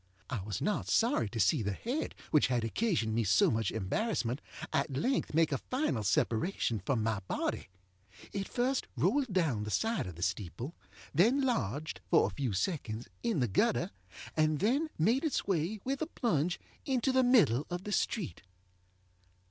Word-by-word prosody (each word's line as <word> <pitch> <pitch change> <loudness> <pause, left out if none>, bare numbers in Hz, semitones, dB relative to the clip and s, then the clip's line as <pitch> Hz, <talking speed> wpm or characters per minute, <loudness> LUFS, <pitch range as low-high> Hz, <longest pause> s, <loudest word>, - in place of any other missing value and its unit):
I 120 -6 -2
was 100 0 -4
not 210 0 0
sorry 230 - +2
to 115 - -5
see 145 +3 +3
the 100 -1 -1
head 245 - -3 0.2
which 150 - +5
had 125 -2 0
occasioned 115 - 0
me 115 +1 +2
so 100 0 +4
much 115 0 0
embarrassment 125 - -1 0.3
at 140 0 +1
length 250 - 0
make 165 -1 +4
a 140 - 0
final 255 - -1
separation 110 - +1
from 110 +4 0
my 110 -2 0
body. - - -2 0.7
It 195 -1 -2
first 255 +2 0
rolled 225 - +2
down 155 - +1
the 105 - -4
side 225 - 0
of 90 - -7
the 85 - -5
steeple, 115 - -3 0.4
then 225 - +4
lodge, 155 - -1
for 165 - +5
a - - -2
few 135 -5 -1
seconds, 110 - -2
in 230 - 0
the 125 - +2
gutter, 95 - +1 0.4
and 155 -1 +3
then 265 - +1
made 225 - +2
its 310 -5 0
way, 190 +2 0
with 270 +1 -2
a 315 - 0
plunge, 180 - 0 0.2
into 265 -1 +1
the 260 0 +4
middle 215 - +4
of 175 +1 -4
the 210 - -5
street. 205 -3 -1
160 Hz, 170 wpm, -32 LUFS, -, 0.7 s, which